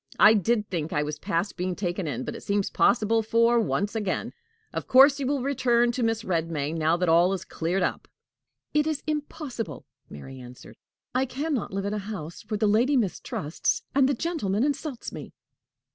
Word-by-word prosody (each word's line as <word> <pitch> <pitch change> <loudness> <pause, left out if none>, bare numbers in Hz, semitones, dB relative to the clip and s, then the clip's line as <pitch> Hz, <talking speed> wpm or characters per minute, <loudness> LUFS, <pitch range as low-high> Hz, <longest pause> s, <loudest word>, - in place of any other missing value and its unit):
I 215 - +8
did 215 +1 +1
think 165 -3 -3
I 150 - +1
was 150 0 -5
past 170 +6 -2
being 180 0 -2
taken 175 -2 -2
in, 130 -3 -3
but - - -5
it - - -8
seems 200 -1 -1
possible 225 -1 +3
for 230 +2 +3
once 205 -2 0
again. 210 -4 -2 0.4
Of - - -4
course, 275 +2 +7
you 270 - -1
will 280 -2 0
return 240 -3 +2
to 245 - -3
Mrs. 225 0 0
Redmain 165 -4 -1
now 160 +1 +2
that 180 0 0
all 170 +3 +4
is 190 -1 -4
cleared 175 +3 -1
up." - - -2 0.7
"It 300 0 +2
is 310 -2 -2
impossible," 290 - -4 0.2
Mary 130 - -10
answered. 125 0 -12 0.4
"I 260 +1 +1
can 290 +5 -3
not 245 - -2
live 195 0 -3
in 200 - -2
a 210 - -1
house 190 -6 -7
where 215 - -1
the 215 - +1
lady 235 +7 +3
mistrusts 175 - -1
and 270 0 +4
the 280 - +1
gentleman 230 - -1
insults 290 -2 -3
me." - - -9
210 Hz, 190 wpm, -26 LUFS, 175-255 Hz, 0.7 s, I